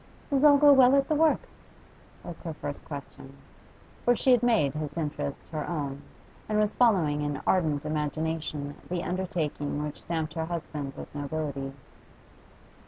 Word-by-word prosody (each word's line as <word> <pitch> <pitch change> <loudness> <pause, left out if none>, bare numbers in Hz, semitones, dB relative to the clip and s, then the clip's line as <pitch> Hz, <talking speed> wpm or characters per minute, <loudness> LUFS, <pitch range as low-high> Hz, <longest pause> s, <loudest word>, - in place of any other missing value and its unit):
'Does 275 0 +2
all 290 -1 +8
go 290 0 +8
well 265 0 +7
at 275 0 +3
the - - +1
works?' 315 +1 +1 0.6
was 175 - -7
her 165 -2 -5
first 145 -1 -6
question. 140 -1 -9 0.7
For 245 - +4
she 260 - +2
had 245 -2 +5
made 225 - +3
his 150 0 -5
interests 145 -3 -3
her 155 -2 -4
own, 140 -4 -3 0.5
and 215 - +1
was 210 0 +2
following 175 -12 +3
in 145 -1 -2
ardent 155 -6 +1
imagination 155 -1 -2 0.2
the 175 -1 -2
undertaking 165 -6 -2
which 150 -1 -6
stamped 160 -2 -3
her 160 -1 -2
husband 150 -4 -5
with - - -9
nobility. 145 -2 -4
155 Hz, 155 wpm, -28 LUFS, 145-200 Hz, 0.7 s, all